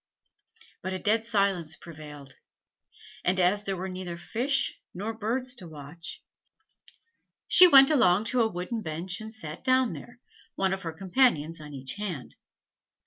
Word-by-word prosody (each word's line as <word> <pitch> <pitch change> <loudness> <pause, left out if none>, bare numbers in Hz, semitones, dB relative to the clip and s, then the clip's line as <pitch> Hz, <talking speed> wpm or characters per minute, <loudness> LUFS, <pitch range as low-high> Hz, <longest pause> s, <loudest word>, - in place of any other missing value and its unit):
But 185 - -4
a - - -2
dead 220 +4 0
silence 195 -7 0
prevailed; 150 -4 -11 0.9
and 185 +1 +1
as 185 +3 +3
there 195 -2 -3
were 185 +2 -4
neither 185 -2 -6
fish 250 - -1
nor 210 +5 -3
birds 240 +4 -2
to 180 - -9
watch, 155 +2 -10 1.2
she 365 - +9
went 270 -3 +8
along 210 -9 +4
to 250 - +3
a 225 - +3
wooden 185 +5 -4
bench 175 +3 -3
and 220 0 -8
sat 165 -7 -8
down 255 -2 +3
there, 240 - -11 0.4
one 190 0 +1
of 195 - -4
her 165 - -4
companions 165 - +1
on 150 -1 -9
each 135 0 -5
hand. 180 -11 -5
190 Hz, 150 wpm, -28 LUFS, 165-225 Hz, 1.2 s, she